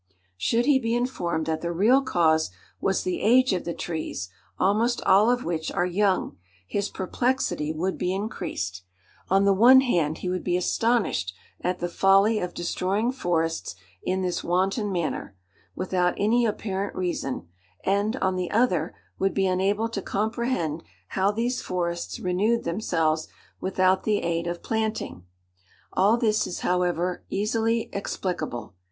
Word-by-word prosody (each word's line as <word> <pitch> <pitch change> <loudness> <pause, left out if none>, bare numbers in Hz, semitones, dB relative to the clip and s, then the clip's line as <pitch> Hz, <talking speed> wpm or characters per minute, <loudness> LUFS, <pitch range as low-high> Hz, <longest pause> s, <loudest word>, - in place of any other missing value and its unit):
Should 230 - +1
he 280 -1 +5
be 230 -1 0
informed 175 -10 -1
that 160 0 -2
the 170 - -2
real 220 +10 +4
cause 160 -10 +2 0.3
was 195 - 0
the 185 - -2
age 250 +1 +4
of 180 - -2
the 170 - -2
trees, 155 - -4 0.3
almost 225 +5 +2
all 205 +4 +5
of 245 0 +1
which 165 -2 -2
are 175 - +1
young, 190 +1 +1 0.3
his 200 - -1
perplexity 190 -6 -1
would 175 +4 -2
be 180 - 0
increased. 105 - -4 0.5
On 195 +1 +4
the 200 0 +5
one 245 +7 +8
hand 165 - +1
he - - -5
would 185 0 -2
be 180 -1 +1
astonished 180 - 0 0.3
at 180 0 0
the 175 - -2
folly 195 +5 +4
of 180 -1 -4
destroying 195 +6 0
forests 165 -9 -1 0.3
in 190 0 -1
this 180 -1 -1
wanton 195 +4 0
manner, 170 - -3 0.4
without 180 -1 0
any 230 +3 +3
apparent 200 -2 -3
reason; 170 - -3 0.4
and, 200 +4 +1
on 190 -7 0
the 180 -1 -2
other, 185 -8 +1 0.2
would 195 0 +1
be 195 - +2
unable 195 +4 +1
to 210 -3 -4
comprehend 215 - -1 0.3
how 195 +1 +1
these 235 +4 -1
forests 170 -1 -3
renewed 205 +6 +1
themselves 165 -4 0 0.3
without 185 0 +2
the 210 -2 0
aid 170 0 -1
of 175 0 -4
planting. 220 - -2 0.7
All 205 +5 +4
this 220 -3 +1
is, 175 - -5
however, 180 0 0
easily 225 +2 0
explicable. 180 - -4
190 Hz, 150 wpm, -25 LUFS, 175-220 Hz, 0.7 s, one